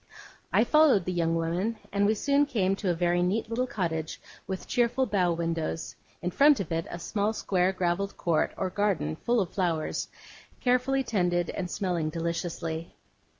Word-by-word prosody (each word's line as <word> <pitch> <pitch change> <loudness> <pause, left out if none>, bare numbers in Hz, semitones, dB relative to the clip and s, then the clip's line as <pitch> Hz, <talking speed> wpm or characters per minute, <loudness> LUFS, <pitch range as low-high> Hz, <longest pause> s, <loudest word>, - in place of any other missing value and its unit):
I - - +4
followed 300 - +4
the 185 - -1
young 165 -1 +1
woman, 175 +7 -1
and 200 0 +2
we 215 - +3
soon 280 +6 +2
came 195 -8 +1
to 200 - -2
a 175 - +2
very 175 +1 +1
neat 200 +6 0
little 250 +3 0
cottage 165 -7 -3 0.3
with 190 0 -5
cheerful 245 +1 +2
bow 185 -6 +1
windows: 165 -1 -3 0.3
in 180 - -1
front 285 - +5
of 185 -5 -4
it, 165 0 -1
a - - -5
small 205 +5 -1
square 185 -3 +1
gravelled 185 +1 -1
court 165 -3 +1
or 185 -1 -2
garden 190 - 0
full 240 0 0
of 190 -5 -2
flowers, 170 -5 -1 0.5
carefully 255 +2 +2
tended, 175 -7 0
and 180 -2 -4
smelling 175 -4 -1
deliciously. 165 0 -4
185 Hz, 170 wpm, -28 LUFS, 170-220 Hz, 0.5 s, front